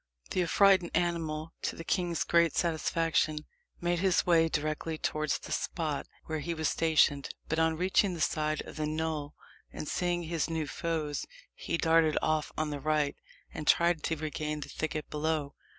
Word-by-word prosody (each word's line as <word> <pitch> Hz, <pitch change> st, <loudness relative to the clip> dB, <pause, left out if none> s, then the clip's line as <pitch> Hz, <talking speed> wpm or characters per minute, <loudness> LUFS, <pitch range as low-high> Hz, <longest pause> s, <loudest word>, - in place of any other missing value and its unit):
The 185 Hz, -, +1 dB
affrighted 185 Hz, 0 st, +4 dB
animal, 165 Hz, -2 st, -1 dB
to -, -, -2 dB
the 165 Hz, -, -7 dB
king's 175 Hz, 0 st, 0 dB
great 170 Hz, -2 st, +3 dB
satisfaction, 160 Hz, -2 st, +1 dB, 0.3 s
made 175 Hz, 0 st, 0 dB
his 185 Hz, -1 st, +3 dB
way 165 Hz, -2 st, +4 dB
directly 155 Hz, +1 st, -2 dB
towards 155 Hz, -1 st, -1 dB
the -, -, -10 dB
spot -, -, -2 dB, 0.2 s
where 155 Hz, 0 st, -3 dB
he 170 Hz, +3 st, -3 dB
was 160 Hz, -2 st, 0 dB
stationed; 155 Hz, -3 st, +3 dB, 0.2 s
but 160 Hz, -, 0 dB
on 160 Hz, 0 st, +2 dB
reaching 185 Hz, +1 st, +2 dB
the -, -, -7 dB
side 155 Hz, 0 st, 0 dB
of -, -, -11 dB
the 155 Hz, -1 st, -1 dB
knoll, 155 Hz, -1 st, -2 dB, 0.4 s
and 150 Hz, -, -6 dB
seeing 175 Hz, +1 st, 0 dB
his 165 Hz, -1 st, -1 dB
new 160 Hz, -1 st, -1 dB
foes, 150 Hz, +1 st, -2 dB, 0.3 s
he -, -, -3 dB
darted 165 Hz, -1 st, +3 dB
off 155 Hz, -1 st, 0 dB
on 155 Hz, -1 st, -1 dB
the 145 Hz, -, -3 dB
right, 150 Hz, -1 st, +1 dB, 0.4 s
and 150 Hz, -, -6 dB
tried 170 Hz, -2 st, +4 dB
to 165 Hz, -, 0 dB
regain 150 Hz, 0 st, -3 dB
the -, -, -7 dB
thicket 155 Hz, -1 st, -3 dB
below. 150 Hz, -1 st, -1 dB
160 Hz, 170 wpm, -30 LUFS, 155-170 Hz, 0.4 s, affrighted